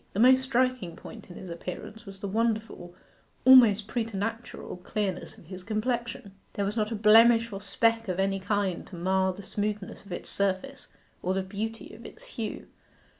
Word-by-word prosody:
The 200 - -2
most 255 +2 +7
striking 255 -8 0
point - - -11
in 175 - -10
his 185 -2 -8
appearance 210 +6 -8
was 195 0 -10
the 200 - -3
wonderful, 220 -4 -2 0.5
almost 235 -6 +8
preternatural, 225 -2 -4
clearness 190 0 -3
of - - -16
his 185 +2 -9
complexion. 230 0 -2 0.2
There 200 - -1
was 205 +2 -2
not 215 -1 0
a - - -1
blemish 225 +2 +6
or 195 - -5
speck 225 +2 +1
of 185 0 -2
any 195 0 +1
kind 200 -2 -1
to - - -10
mar 190 +2 +1
the 200 +2 -10
smoothness 210 0 -4
of 200 - -14
its 175 - -5
surface 200 +7 -1 0.3
or 185 +1 -1
the 190 - 0
beauty 215 +4 -5
of 225 - -12
its - - -12
hue. 225 -2 -5
210 Hz, 175 wpm, -28 LUFS, 190-230 Hz, 0.5 s, almost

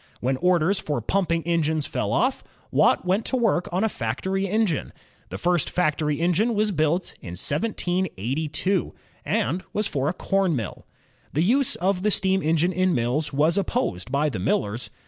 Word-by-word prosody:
When 130 +2 0
orders 180 +3 +2
for 145 -4 -2
pumping 170 - 0
engines 160 -2 0
fell - - -2
off, - - +1 0.3
Watt - - +3
went 190 +5 +1
to - - -1
work 215 -7 +1
on 185 +4 0
a - - +3
factory 190 - -2
engine. 210 -6 0 0.4
The 95 - -5
first 175 - +1
factory 150 -3 0
engine 185 +7 +2
was 210 0 +2
built 160 +1 0
in 85 - -7
1782, 160 - -1 0.3
and 165 +10 0
was 210 - +1
for 140 -3 0
a - - -1
com 195 -2 +1
mill. 115 -7 -5 0.5
The 155 - +2
use 255 +7 +2
of 185 +1 0
the 210 - +2
steam 190 -1 +2
engine 165 +3 +2
in 185 +1 +2
mills 125 +6 0
was 155 +7 +2
opposed 125 - -2
by 145 +2 +2
the 110 - -4
millers. 105 +4 -1
170 Hz, 165 wpm, -24 LUFS, 145-190 Hz, 0.5 s, Watt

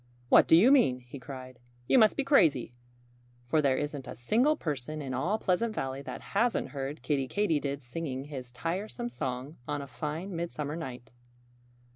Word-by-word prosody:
"What - - +7
do - - +7
you 215 +11 +7
mean?" 130 - +4
he 125 +3 -10
cried. 130 -1 -9 0.3
"You 260 - +6
must 215 -2 +5
be 280 - +2
crazy! 160 - +4 0.7
For 155 +6 +2
there 135 -3 +2
isn't 145 -2 -4
a - - -6
single 235 - +2
person 155 - -4
in 135 -3 -4
all 170 +12 0
Pleasant 215 +3 0
Valley 135 0 -3
that - - -7
hasn't 230 +3 +1
heard 140 +1 -5
Kiddie 140 -3 0
Katydid 145 -7 0
singing 130 +1 -4
his 135 -4 -8
tiresome 190 - -3
song 135 - -4
on 145 -1 -1
a 140 - -5
fine 155 +8 -5
midsummer 155 -3 -3
night." 125 -8 -7
145 Hz, 170 wpm, -30 LUFS, 130-180 Hz, 0.7 s, What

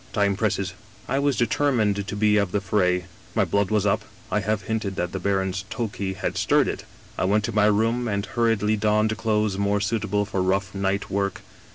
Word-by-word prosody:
Time 100 -2 +2
presses.' 100 -2 -1 0.2
" - - -25
I - - +2
was 140 -2 +1
determined 110 -5 +1
to - - -4
be 105 0 +3
of 100 -3 +1
the 105 - +1
fray; 90 -3 +1 0.3
my - - +3
blood 100 -1 +1
was 105 -2 +1
up 100 - +2 0.3
I - - +2
have 105 +1 -1
hinted 110 -2 -2
that 90 -2 -2
the 95 - -3
baron's 95 0 -1
Tokay 100 -4 -3
had - - -3
stirred - - +3
it. - - -4 0.2
" - - -24
I - - +2
went 105 +2 +2
to 115 - -2
my 105 -1 +3
room 115 +4 +2
and 100 -2 -1
hurriedly 110 -2 +1
donned 105 +1 +2
clothes 105 -1 0
more 100 0 +1
suitable 105 0 0
for 100 -2 -2
rough 95 +1 0
night 100 0 -1
work. 100 0 -1
100 Hz, 210 wpm, -24 LUFS, 95-110 Hz, 0.3 s, be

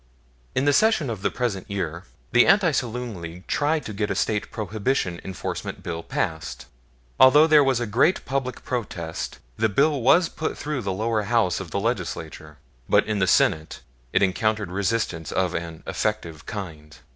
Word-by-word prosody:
In 130 +2 +1
the 145 - +4
session 215 - +3
of 105 -4 -5
the - - +1
present 115 -7 -3
year, 90 -3 -3 0.3
the 120 - +5
Anti 195 -4 +5
Saloon 120 - -3
League 85 +2 -8
tried 150 0 0
to 110 - -5
get 105 +1 -2
a - - -1
State 105 -2 -1
Prohibition 105 -3 -2
enforcement 95 -3 -5
bill 85 -2 -4
passed. 80 -1 -3 0.5
Although 140 +4 +8
there 155 -2 +6
was 135 -3 +2
a 120 - -1
great 120 - +2
public 130 -1 -3
protest, 90 -10 -4 0.2
the 110 +1 +2
bill 140 +6 +2
was 165 +8 +5
put 160 - -4
through 150 -3 -3
the 100 -3 -2
lower 110 +3 0
House 105 -4 +1
of 95 -3 -7
the 100 - -2
Legislature; 85 -8 -4 0.3
but - - +4
in 105 -1 -1
the 95 - +2
Senate 80 -2 +2 0.3
it 100 - +3
encountered 105 0 0
resistance 95 -5 -1
of 95 -2 0
an 85 -2 -5
effective 85 -8 -3
kind. 80 -7 -7
105 Hz, 170 wpm, -24 LUFS, 90-130 Hz, 0.5 s, Although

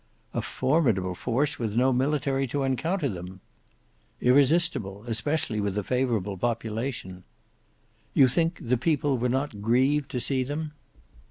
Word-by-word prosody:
"A - - -1
formidable 125 - +1
force 130 - -1
with 110 -3 -2
no 130 +2 +3
military 135 0 0
to 140 +3 -1
encounter 150 +5 0
them." 95 -3 -7 0.8
"Irresistible, 130 - +2
especially 120 -1 -1
with 100 0 -2
a 105 - 0
favourable 115 -5 -1
population." 115 -3 -3 0.9
"You 135 - +7
think 165 +6 0
the 125 -4 0
people 145 0 +1
were 125 +1 +1
not 130 -4 -2
grieved 130 +6 +2
to 125 - -2
see 130 +1 0
them?" 150 +4 -3
125 Hz, 135 wpm, -27 LUFS, 110-145 Hz, 0.9 s, You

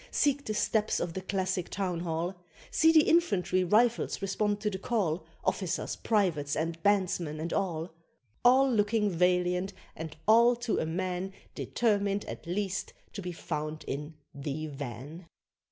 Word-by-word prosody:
seek 285 -1 +2
the 215 - -2
steps 215 +1 +1
of 170 -1 -2
the 190 - -4
classic 190 -2 -1
Town 185 -4 -2
Hall: 170 +1 -2 0.4
See 320 +1 +5
the 315 -2 +7
infantry 195 - +3
Rifles 225 +6 +2
respond 205 +1 0
to 210 -1 0
the 190 - -4
call, 180 -7 -1 0.2
Officers, 185 -4 -1
privates, 170 -10 +1
and 165 +1 -2
bandsmen, 180 -6 +1
and 165 +2 -3
all; 170 -3 -1 0.5
All 260 +3 +6
looking 210 -1 +2
valiant, 180 +2 +1 0.2
and 160 0 -7
all 235 +3 +6
to 240 -1 -1
a 160 - -1
man 185 +2 -2 0.2
Determined 205 -3 0
at - - -8
least 190 +1 -2 0.2
to 200 - -5
be 180 -1 -4
found 155 -2 -4
in 150 +3 -4 0.2
"the 140 +2 -4
van." 145 +3 -7
185 Hz, 150 wpm, -30 LUFS, 165-210 Hz, 0.5 s, the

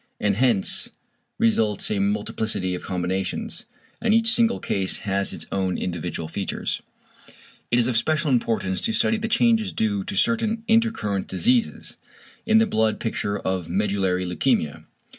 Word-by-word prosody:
And 105 -1 +1
hence 115 -6 +2 0.5
results 110 -2 +2
a 105 - 0
multiplicity 100 -1 -1
of 90 - -4
combinations, 95 +1 -3 0.3
and 220 -1 +3
each 225 0 +4
single 235 0 +2
case 95 -1 0
has 100 0 0
its - - -5
own 95 -2 0
individual 85 -2 -4
features. 95 +4 -3 0.9
It 120 - +2
is 120 - +4
of 125 -1 0
special 155 +5 +1
importance 115 -6 0
to 225 +2 +1
study 225 - +2
the 220 - -2
changes 225 -2 +3
due 100 -3 0
to - - -5
certain 225 - +1
intercurrent 220 - +1
diseases 240 0 0 0.5
in 220 0 +5
the 225 - +5
blood 110 - +1
picture 100 -2 -2
of 95 -4 -3
medullary 95 -1 0
leukæmia. 90 - 0
105 Hz, 145 wpm, -24 LUFS, -, 0.9 s, in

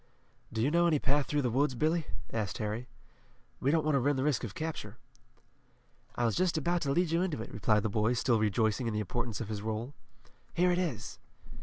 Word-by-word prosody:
"Do 110 0 -1
you 140 - +2
know 170 +1 +4
any 160 -3 +3
path 140 +1 +1
through 145 -1 0
the 125 - +1
woods, 135 +2 +2
Billy?" 155 +4 +1 0.3
asked 105 -6 -2
Harry. 110 +3 -3 0.7
"We 135 - +1
don't 160 0 +2
want 155 - +2
to 140 - +4
run 140 +3 +2
the 130 - 0
risk 145 -4 +1
of 105 -4 -5
capture." 150 -9 -5 1.2
"I 120 - +1
was 115 - +2
just 180 -2 +2
about 170 +3 +1
to 140 - 0
lead 170 +2 +2
you 165 +1 +2
into 180 -9 -1
it," 110 - -6
replied 105 0 +2
the - - +1
boy, 110 +3 +1
still 120 -1 +2
rejoicing 110 +3 +1
in 110 - -1
the - - 0
importance 115 +2 -2
of 115 - -4
his 105 -2 -3
role. 110 +5 -3 0.6
"Here 180 +1 +4
it 175 - +2
is." 150 -11 -3
125 Hz, 220 wpm, -31 LUFS, 110-155 Hz, 1.2 s, know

